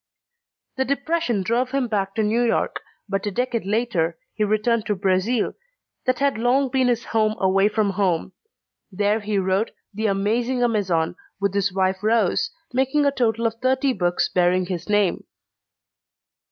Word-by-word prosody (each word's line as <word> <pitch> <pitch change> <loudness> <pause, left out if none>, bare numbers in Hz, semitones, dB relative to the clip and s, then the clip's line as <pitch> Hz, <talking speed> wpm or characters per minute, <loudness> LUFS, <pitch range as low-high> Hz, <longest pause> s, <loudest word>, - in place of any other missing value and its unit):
_ - - -53
The 265 - +1
depression 280 - 0
drove 240 +6 0
him 275 -2 0
back 195 -3 -2
to 220 - +1
New 220 +3 +1
York, 235 -2 0 0.3
but 195 0 -2
a - - +2
decade 235 0 -2
later 200 -7 0 0.2
he 215 - -1
returned 215 +2 +1
to 210 - +1
Brazil 195 +4 +1 0.5
that 255 -1 +2
had 280 -5 +1
long 255 +3 +2
been 260 0 +2
his 240 -1 0
home 215 -1 +1
away 195 +1 +3
from 210 -2 +1
home. 185 -2 0 0.6
There 205 +3 +1
he 210 -1 -2
wrote 190 +3 +1 0.2
The 215 +2 -1
Amazing 230 +6 0
Amazon, 190 -9 0 0.2
with 200 -1 0
his 200 -1 +1
wife 190 0 0
Rose, 220 +2 +2 0.2
making 265 +3 +2
a 280 - +4
total 230 -4 0
of 225 - +1
thirty 260 +1 +2
books 175 -4 0
bearing 180 0 +2
his 180 0 -5
name. 205 -3 +2
215 Hz, 165 wpm, -23 LUFS, 195-245 Hz, 0.6 s, a